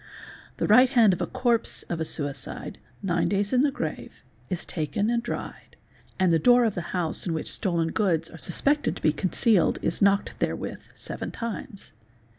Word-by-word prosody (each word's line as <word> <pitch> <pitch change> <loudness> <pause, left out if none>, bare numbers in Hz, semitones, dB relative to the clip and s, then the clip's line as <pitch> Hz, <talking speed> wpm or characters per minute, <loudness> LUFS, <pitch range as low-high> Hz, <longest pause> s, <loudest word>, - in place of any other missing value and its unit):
The - - 0
right 250 +5 +6
hand 230 -6 +5
of 180 - -3
the - - -1
corpse 235 -3 0
of 170 - -4
a - - 0
suicide, 145 -3 -5 0.2
nine 175 -3 +1
days 200 +2 0
in 250 - +4
the 290 - +3
grave, 275 - -6 0.3
is 180 -3 -3
taken 185 +7 -1
and 235 -1 +1
dried, - - -7 0.4
and 185 -2 +3
the 165 - +4
door 245 +6 +5
of 220 - +1
the 175 - -3
house 175 -1 -1
in 165 - 0
which 160 - -3
stolen 170 -5 0
goods 170 -6 +1
are 165 - -12
suspected 285 - +1
to - - -10
be 155 - +4
con 185 +4 -1
cealed 215 -3 +3
is - - -1
knocked 200 0 +3
therewith - - -3
seven - - -5
times. 230 -1 -6
195 Hz, 190 wpm, -26 LUFS, 170-235 Hz, 0.4 s, right